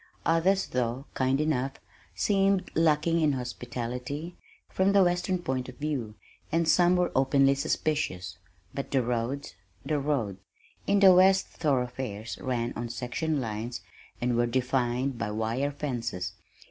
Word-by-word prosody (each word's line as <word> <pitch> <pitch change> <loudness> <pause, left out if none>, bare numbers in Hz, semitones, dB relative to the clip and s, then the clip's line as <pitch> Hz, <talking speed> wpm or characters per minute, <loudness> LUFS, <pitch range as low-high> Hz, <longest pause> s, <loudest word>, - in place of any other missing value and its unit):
Others 185 +4 +2
though 125 +2 -1
kind 130 +1 +1
enough, 135 -3 0 0.4
seemed 195 -2 +2
lacking 165 +1 +3
in 150 -2 +3
hospitality, 125 +5 -5 0.3
from 190 +1 +1
the 200 -1 +6
western 180 +1 +1
point 130 -7 -3
of 125 - -11
view, 135 -8 -3 0.4
and 165 +1 +1
some 175 +2 +5
were 180 -1 +1
openly 135 +1 +4
suspicious 140 - -2 0.3
but 140 - -4
the 135 -2 +2
roads, 120 +3 -2 0.3
the 150 -2 0
roads! 125 -10 -1 0.5
In 200 0 +3
the 190 -2 +9
west 190 +1 +5
thoroughfares 125 - -2
ran 120 -2 -1
on 120 +1 -4
section 130 +6 -2
lines 110 -3 -4 0.4
and 120 0 0
were 120 0 +2
defined 125 0 0
by 105 - -2
wire 110 +6 -1
fences. 115 -11 -3
135 Hz, 135 wpm, -28 LUFS, 120-160 Hz, 0.5 s, the